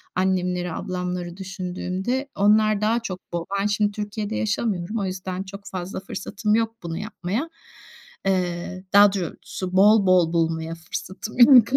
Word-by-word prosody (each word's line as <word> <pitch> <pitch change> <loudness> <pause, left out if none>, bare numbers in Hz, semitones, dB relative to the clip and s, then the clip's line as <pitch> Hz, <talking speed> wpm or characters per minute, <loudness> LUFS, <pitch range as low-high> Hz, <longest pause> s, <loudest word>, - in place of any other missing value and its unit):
annemleri, 180 -1 0
ablamları 180 -1 -4
düşündüğümde, 190 +6 -3
onlar 215 +1 +4
daha 225 +3 +2
çok 185 -5 -7
bol 170 -1 -2
Ben 200 - +1
şimdi 205 0 +1
Türkiye'de 210 +1 -4
yaşamıyorum. 210 -2 -1
O 195 - -1
yüzden 185 0 -4
çok 200 +1 -10
fazla 185 +1 -4
fırsatım 210 +2 -2
yok 225 0 0
bunu 165 -1 -4
yapmaya. 215 - -3 0.8
Eee, 185 -1 -1
daha 205 0 +8
doğrusu 185 0 -4
bol 200 +1 +6
bol 175 -2 +4
bulmaya 165 0 0
fırsatım 185 +7 -7
yok. 240 -2 +9
190 Hz, 140 wpm, -24 LUFS, 180-210 Hz, 0.8 s, yok